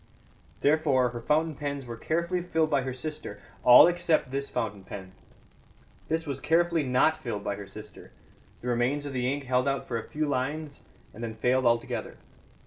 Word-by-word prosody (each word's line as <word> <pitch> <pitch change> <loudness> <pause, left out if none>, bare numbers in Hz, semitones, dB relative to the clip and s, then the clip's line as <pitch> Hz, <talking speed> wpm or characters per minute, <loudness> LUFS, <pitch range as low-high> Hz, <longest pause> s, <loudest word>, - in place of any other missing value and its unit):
Therefore, 145 -4 +3
her 120 0 -7
fountain 155 +5 +1
pens 140 -2 -4
were 120 -1 -6
carefully 170 +8 -1
filled 160 -3 0
by 135 - +3
her 130 0 -3
sister 130 -6 -6 0.2
all 125 0 +10
except 170 -5 +1
this 140 +1 -2
fountain 105 -3 -3
pen. 95 -1 -9 1.0
This 160 +1 0
was 140 -3 -4
carefully 170 0 +2
not 135 +4 +2
filled 105 -5 -4
by 100 - -1
her 100 -1 -8
sister; 105 +1 -11 0.5
the 125 - -6
remains 125 +4 +1
of 140 - -5
the 125 0 0
ink 140 0 -3
held 125 0 +1
out 140 -1 -1
for 115 -2 -2
a - - -10
few 155 +1 -1
lines 145 +2 -3 0.3
and 115 - -8
then 110 -1 -4
failed 125 +3 +2
altogether. 115 0 -1
135 Hz, 180 wpm, -28 LUFS, 120-155 Hz, 1.0 s, all